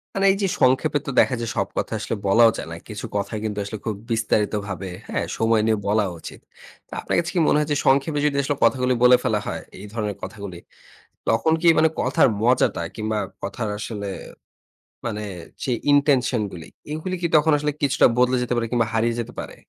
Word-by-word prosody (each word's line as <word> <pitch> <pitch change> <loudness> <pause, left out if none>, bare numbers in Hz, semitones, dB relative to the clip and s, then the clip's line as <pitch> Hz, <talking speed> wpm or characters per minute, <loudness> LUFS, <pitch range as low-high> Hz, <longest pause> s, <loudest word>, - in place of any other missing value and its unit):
মানে 195 0 +1
এই - - +1
যে - - +3
সংক্ষেপে 130 +4 +3
তো - - -1
দেখা 130 - +4
যায় 115 - -3
সব 100 - +1
কথা - - -1
আসলে 105 - -3
বলাও 115 +4 +6
যায় - - -6
না। - - -5
কিছু 105 -1 -6
কথা 100 +3 -3
কিন্তু 105 -2 -3
আসলে 105 +2 -6
খুব 110 -2 -1 0.2
বিস্তারিতভাবে, 105 -3 -1 0.2
হ্যাঁ? - - -1
সময় 115 -1 +3
নিয়ে 110 -1 +2
বলা 105 +1 +2
উচিত। - - -9 0.5
তো, - - -37
আপনার - - -2
কাছে 170 +1 -2
কি - - +3
মনে - - +4
হয় 150 - 0
যে 145 - +2
সংক্ষেপে 140 +3 +3
যদি 145 -1 +1
আসলে 145 +1 -1
কথাগুলো 125 -1 +3
বলে 125 0 +8
ফেলা - - +1
হয়, - - -3 0.2
এই 100 - -9
ধরনের 105 -3 -2
কথাগুলি। 100 -4 -7 0.7
তখন 115 +8 +3
কি 170 - +3
মানে 160 - +5
কথার 130 +1 +3
মজাটা 120 -6 +2
কিংবা 110 0 -2 0.3
কথার 110 +2 -3
আসলে 105 -2 -5 1.0
মানে 105 -2 -3 0.4
যে 130 - -1 0.2
intention 140 -4 +3
গুলি, 85 -2 -9 0.2
এইগুলি 160 +4 -3
কি 170 - +1
তখন 155 +1 +5
আসলে 150 0 -1
কিছুটা 140 -1 +3
বদলে 125 +1 +3
যেতে 125 0 -1
পারে 115 -1 0
কিংবা 120 -2 +2
হারিয়ে 115 +1 +1
যেতে 115 - -5
পারে? - - -7
115 Hz, 200 wpm, -23 LUFS, 105-140 Hz, 1.0 s, বলে